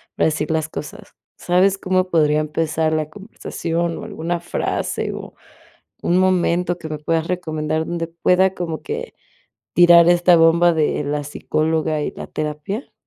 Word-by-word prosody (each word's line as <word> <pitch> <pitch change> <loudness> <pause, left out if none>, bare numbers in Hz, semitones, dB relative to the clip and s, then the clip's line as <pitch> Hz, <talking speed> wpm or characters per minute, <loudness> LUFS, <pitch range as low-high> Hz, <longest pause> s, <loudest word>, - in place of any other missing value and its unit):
para - - +2
decir 155 0 -2
las 160 -1 -1
cosas, 150 - -9 0.2
¿sabes 185 +2 +2
cómo 185 -1 0
podría 155 -3 +3
empezar 155 +1 -1
la 155 -1 -1
conversación, 170 -3 -4
o - - -7
alguna 175 -4 -3
frase, 175 - -2
o - - -8 0.7
un 175 - +2
momento 180 -1 +1
que 160 -2 -8
me 155 -1 -5
puedas 160 +1 -1
recomendar 160 -3 -2
donde 170 -1 -2
pueda 180 +3 +2
como 165 -3 -4
que 470 +3 -5 0.6
tirar 175 -1 +7
esta 175 0 +5
bomba 170 +1 +5
de 150 -1 0
la 145 +1 -2
psicóloga 155 +1 -1
y - - -2
la - - -8
terapia? 155 - -5
165 Hz, 150 wpm, -20 LUFS, 155-180 Hz, 0.7 s, tirar